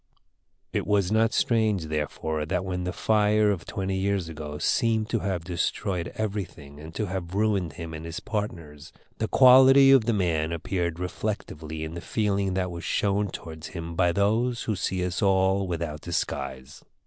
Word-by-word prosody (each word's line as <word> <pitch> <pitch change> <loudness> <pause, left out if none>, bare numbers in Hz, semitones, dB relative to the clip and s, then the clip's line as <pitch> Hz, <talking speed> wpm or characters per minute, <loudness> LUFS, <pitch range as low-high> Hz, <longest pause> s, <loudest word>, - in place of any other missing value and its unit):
It - - -1
was 100 -2 +2
not 110 +1 +3
strange, 110 - +1
therefore, 75 0 -2
that 90 +2 -1
when 90 -1 -3
the 90 - -1
fire 105 0 +3
of 90 -5 -4
twenty 95 0 -2
years 95 -3 -1
ago 75 -2 -6
seemed 110 +6 +1
to 115 - +1
have 95 -5 -2
destroyed 90 +1 -2
everything 95 -9 -5
and 80 +2 -9
to 110 - -1
have 95 -1 -5
ruined 100 -7 +1
him 80 +1 -7
and 80 0 -7
his 85 0 -5
partners, 85 -9 -5 0.3
the 110 - 0
quality 135 +2 +7
of 135 -5 +6
the 115 - +2
man 85 -5 0
appeared 85 0 -2
reflectively 85 -4 -4
in 80 +1 -5
the 85 - -6
feeling 100 0 0
that 90 -1 -1
was 85 -1 -7
shown 100 0 0
towards 80 -1 -8
him 85 0 -5
by 90 0 +2
those 110 +6 +1
who 110 - -1
see 90 0 -1
us 90 +3 -3
all 95 -1 +2
without 85 -3 -4
disguise. 65 -5 -4
95 Hz, 170 wpm, -26 LUFS, 80-105 Hz, 0.3 s, quality